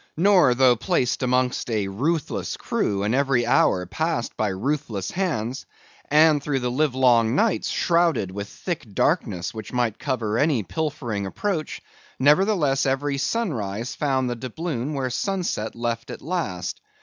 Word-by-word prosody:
Nor, 180 -8 +5
though 130 -1 +5
placed 125 0 0
amongst 125 -1 0
a 105 -4 0
ruthless 145 - -2
crew 100 -1 -1
and 105 +3 0
every 135 -3 +2
hour 90 -5 +3
passed 155 - -2
by 110 - 0
ruthless 110 0 -2
hands, 135 - -2 0.4
and 150 0 +5
through 140 -2 -1
the 125 0 -1
livelong 125 -4 +3
nights 225 +8 +1
shrouded 165 - +1
with 100 +1 -6
thick 175 -4 -4
darkness 105 - 0
which 110 -2 -8
might 120 -4 -1
cover 115 -5 -1
any 145 -7 +2
pilfering 120 - -3
approach, 165 - -3 0.4
nevertheless 150 -2 +3
every 140 +1 0
sunrise 120 - -2
found 135 -3 0
the 120 - -2
doubloon 130 +2 -4
where 135 -2 -1
the 125 - -2
sunset 180 - -2
left 115 -1 -3
it - - -8
last. 135 - -3
130 Hz, 145 wpm, -24 LUFS, 115-155 Hz, 0.4 s, Nor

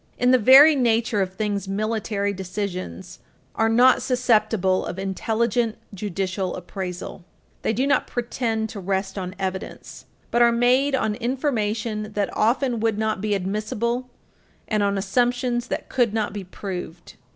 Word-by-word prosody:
In 250 0 +3
the 255 - +5
very 275 +7 +8
nature 230 -4 +1
of 185 0 -3
things, 205 -2 -2
military 205 0 -1
decisions 185 -1 -5 0.3
are 225 0 +1
not 245 +3 +5
susceptible 220 -7 +2
of - - -5
intelligent 225 +4 -1 0.2
judicial 190 -1 -3
appraisal. 180 0 -6 0.4
They - - 0
do 245 +5 0
not 280 +1 +2
pretend 230 -2 -2
to 210 - -7
rest 190 0 -2
on 185 -1 -5
evidence, 190 -1 -6 0.3
but 240 - +2
are 235 0 +6
made 250 +4 +3
on 220 -5 0
information 220 -4 -2
that 205 -1 -2
often 240 +2 +1
would 220 -1 0
not 215 -2 -1
be 210 -1 0
admissible 215 +6 -2 0.6
and 215 -1 0
on 200 0 +1
assumptions 245 +4 0
that - - -4
could 235 -4 +1
not 210 -3 -1
be 200 -2 -6
proved. 180 -3 -7
215 Hz, 145 wpm, -23 LUFS, 195-240 Hz, 0.6 s, very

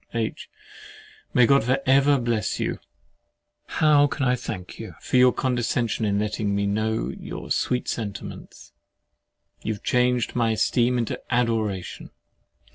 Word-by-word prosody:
H. - - -3 0.8
May 125 - +5
God 140 +1 +4
for 130 +3 +2
ever 140 +2 +4
bless 120 -4 -1
you! - - -2 0.9
How 150 -2 +4
can 140 -1 -2
I 125 0 +3
thank 95 -7 -7
you - - -8
for - - 0
your 125 0 +6
condescension 120 -3 -1
in 100 -1 +1
letting 105 -1 -1
me 100 0 0
know 110 +2 -1
your - - -8
sweet 125 - 0
sentiments? 100 -3 -6 0.9
You 110 - -2
have - - -16
changed 125 -1 +1
my 115 -2 +2
esteem 120 +3 +2
into 115 -2 -2
adoration. 110 -6 -1
120 Hz, 135 wpm, -24 LUFS, 110-125 Hz, 0.9 s, your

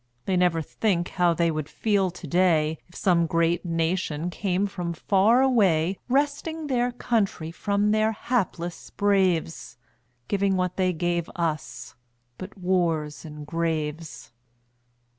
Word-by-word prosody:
They 190 - 0
never 175 -3 +2
think 180 -1 -1
how 175 -2 +2
they 170 0 +2
would 155 -1 -4
feel 200 -4 +1
to 175 0 -10
day, 160 -2 +2
If 175 - -20
some 170 -3 +2
great 170 +1 +1
nation 165 -1 -1
came 190 +1 0
from 180 -4 -4
far 205 +9 +3
away, 190 -9 +2
Wresting 290 +4 0
their 245 -3 0
country 210 -9 -1
from 205 +3 0
their 215 +1 +2
hapless 195 -7 -3
braves, 185 -9 0 0.5
Giving 200 -1 +1
what 180 -1 -1
they 185 -1 +1
gave 175 0 -1
us 155 -6 -3 0.5
but 185 +2 -9
wars 170 -5 -1
and 150 -1 -8
graves. 160 -4 -3
180 Hz, 130 wpm, -25 LUFS, 165-200 Hz, 0.5 s, far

